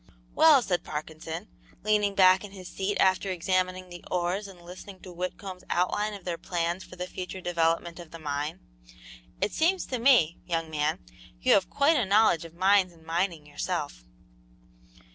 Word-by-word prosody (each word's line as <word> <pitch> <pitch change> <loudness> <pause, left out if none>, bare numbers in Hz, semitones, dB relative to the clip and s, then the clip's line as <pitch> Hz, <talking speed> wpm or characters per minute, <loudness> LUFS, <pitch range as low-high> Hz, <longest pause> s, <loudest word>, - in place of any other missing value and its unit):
"Well," 305 -5 +6
said 180 -5 -1
Parkinson, 160 +4 -6 0.4
leaning 210 -2 +2
back 185 0 +6
in 200 -1 -9
his 185 -2 -10
seat 195 +1 -2
after 190 +1 +3
examining 185 0 -1
the 175 -1 -10
ores 180 +3 -1
and 190 -2 -13
listening 185 +2 -11
to 185 - -10
Whitcomb's 185 +1 -6
outline 205 +4 0
of 195 - -12
their 175 -2 -3
plans 175 +1 -2
for - - -13
the 180 0 -4
future 185 +1 -6
development 170 -1 0
of 170 -2 -10
the 165 - -9
mine, 150 +2 -4 0.8
"it 200 - 0
seems 360 +4 +2
to 255 - -3
me, 230 - +4
young 165 -2 -2
man, 150 - -1 0.3
you - - +4
have 190 -2 +3
quite 295 +3 +3
a 245 - +2
knowledge 195 -5 +4
of 165 0 -12
mines 190 0 +4
and 165 -2 -20
mining 165 -1 -1
yourself." - - -4
180 Hz, 170 wpm, -28 LUFS, 165-200 Hz, 0.8 s, Well